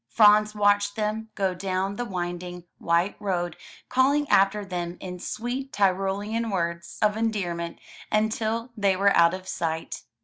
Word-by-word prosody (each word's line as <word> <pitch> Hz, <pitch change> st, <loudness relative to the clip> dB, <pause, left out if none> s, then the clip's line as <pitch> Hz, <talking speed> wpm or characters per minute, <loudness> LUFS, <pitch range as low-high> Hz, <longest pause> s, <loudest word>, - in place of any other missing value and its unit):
Franz 210 Hz, 0 st, +5 dB
watched 205 Hz, 0 st, +2 dB
them 220 Hz, 0 st, -2 dB
go 190 Hz, -2 st, 0 dB
down 190 Hz, +1 st, -2 dB
the 245 Hz, -, -3 dB
winding, 175 Hz, -2 st, -5 dB, 0.2 s
white 170 Hz, +4 st, +1 dB
road, 175 Hz, -4 st, -2 dB, 0.3 s
calling 280 Hz, +3 st, +2 dB
after 200 Hz, +1 st, +3 dB
them 175 Hz, -2 st, -4 dB
in 180 Hz, -1 st, -7 dB
sweet 250 Hz, +8 st, -4 dB
Tyrolean 200 Hz, +4 st, 0 dB
words 170 Hz, -3 st, -3 dB
of 210 Hz, 0 st, +3 dB
endearment 180 Hz, -7 st, -2 dB, 0.3 s
until 220 Hz, +2 st, 0 dB
they 200 Hz, -3 st, +2 dB
were 200 Hz, +1 st, +3 dB
out 170 Hz, +2 st, +5 dB
of 185 Hz, 0 st, -10 dB
sight. 165 Hz, -1 st, -3 dB
200 Hz, 140 wpm, -26 LUFS, 180-215 Hz, 0.3 s, Franz